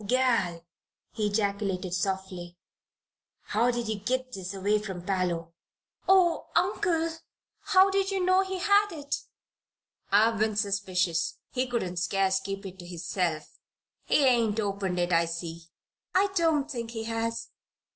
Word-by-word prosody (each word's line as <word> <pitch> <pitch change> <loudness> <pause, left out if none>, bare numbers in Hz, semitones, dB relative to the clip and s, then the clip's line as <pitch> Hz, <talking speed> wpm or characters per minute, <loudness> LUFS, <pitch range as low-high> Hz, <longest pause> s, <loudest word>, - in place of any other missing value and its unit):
"Gal!" 230 -9 +1 0.5
he 215 -2 -1
ejaculated, 200 -3 -1
softly, 185 -2 -3 0.9
"how'd 235 +3 +2
ye 230 -2 -1
git 255 +4 -1
this 185 -3 -5
away 200 +2 +1
from 190 -4 -6
Parloe?" 175 -3 -1 0.6
"Oh, 365 -3 +4
Uncle! 350 -3 +1 0.5
how 380 0 +4
did 390 0 +1
you 390 -1 0
know 370 +1 +5
he 380 0 -3
had 410 +2 +3
it?" 290 -3 -3 0.9
"I've 220 +2 +4
been 215 0 +1
suspicious. 190 -5 0
He 255 0 0
couldn't 190 -8 -2
scarce 190 +2 +1
keep 195 +1 -5
it 190 0 -8
to 175 - -9
hisself. 170 -2 -3 0.5
He 285 - +3
ain't 230 -4 +3
opened 200 -3 -1
it, 175 0 +1
I 170 0 +4
see." 165 0 -6 0.5
"I 395 +2 +4
don't 320 -5 +2
think 235 -4 -4
he 225 -1 -5
has." 230 0 -2
210 Hz, 135 wpm, -28 LUFS, 185-255 Hz, 0.9 s, know